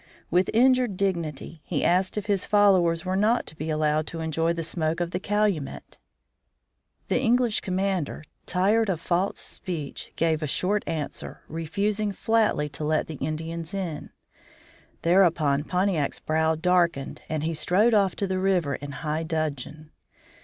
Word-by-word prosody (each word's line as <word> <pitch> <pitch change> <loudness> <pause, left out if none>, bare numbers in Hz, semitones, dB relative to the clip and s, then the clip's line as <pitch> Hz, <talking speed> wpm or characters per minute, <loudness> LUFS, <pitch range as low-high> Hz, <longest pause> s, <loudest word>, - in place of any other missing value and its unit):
With 180 +3 +3
injured 250 -3 +3
dignity 170 -5 -2
he - - -2
asked 185 +3 +2
if 210 - -2
his 200 -3 0
followers 190 -5 +3
were 185 +1 -1
not 215 +5 +2
to - - -9
be 155 +1 -5
allowed 155 0 +1
to 165 - -5
enjoy 160 +1 0
the 170 -1 -2
smoke 160 0 -1
of 175 -1 -2
the 180 - -2
calumet. 200 -8 -1 1.1
The - - +1
English 240 -2 +2
commander, 185 -5 -1 0.2
tired 205 +4 +2
of 175 -4 0
false 180 +3 0
speech, 155 -7 -5
gave 160 -1 +1
a 155 - -1
short 195 +8 0
answer, 155 -3 -5
refusing 200 +6 -1
flatly 220 -9 +1
to 140 +2 -7
let 155 +1 +1
the 155 - -7
Indians 165 +4 -4
in. 175 -6 -4 0.9
Thereupon 165 -5 +3
Pontiac's 180 -5 0
brow 160 +1 +1
darkened 170 -4 +1
and 155 -1 -2
he 165 +1 -1
strode 195 +9 +3
off 200 -3 +3
to 200 - -1
the 190 -1 -1
river 180 -6 +1
in 145 +1 -6
high 155 +2 -3
dudgeon. 155 -1 -4
170 Hz, 155 wpm, -26 LUFS, 155-195 Hz, 1.1 s, With